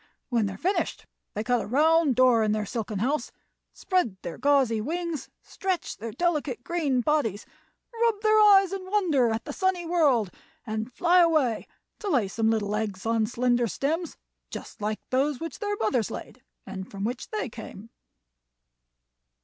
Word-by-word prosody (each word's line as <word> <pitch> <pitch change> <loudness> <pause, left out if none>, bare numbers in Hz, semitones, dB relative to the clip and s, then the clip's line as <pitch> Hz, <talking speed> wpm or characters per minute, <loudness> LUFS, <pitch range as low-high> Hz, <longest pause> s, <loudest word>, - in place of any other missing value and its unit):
When 230 -5 +1
they 195 - -4
are - - -11
finished 380 - -1 0.3
they 210 - -2
cut 245 0 +1
a - - -6
round 305 +3 +3
door 250 -2 +5
in 215 -1 +2
their 215 -1 -1
silken 215 -1 -4
house, 270 +9 -1 0.4
spread 360 - -1
their 170 - -6
gauzy 260 -5 +3
wings, 335 +4 -3
stretch 375 -2 -3
their 225 +1 -6
delicate 295 -4 -1
green 295 -7 0
bodies, 240 -8 0 0.5
rub 460 -2 +1
their 435 0 +4
eyes 390 -3 +6
in 375 -1 -5
wonder 330 - +2
at 220 +1 -2
the - - -5
sunny 375 -2 0
world, 285 - +2 0.3
and 220 +1 -3
fly 355 +6 +3
away 310 -9 +2 0.3
to 415 - -4
lay 250 - +2
some 220 +3 0
little 210 -2 0
eggs 210 -3 -3
on 225 -1 +1
slender 245 0 +1
stems 315 - -2 0.3
just - - -9
like 215 +1 -2
those 270 +1 +1
which 330 0 -6
their 415 -1 -1
mothers 225 - 0
laid - - -8 0.2
and 190 0 -7
from 195 -1 -6
which 245 +4 -3
they 430 -10 -2
came." 225 -1 -10
255 Hz, 165 wpm, -26 LUFS, 220-340 Hz, 0.5 s, eyes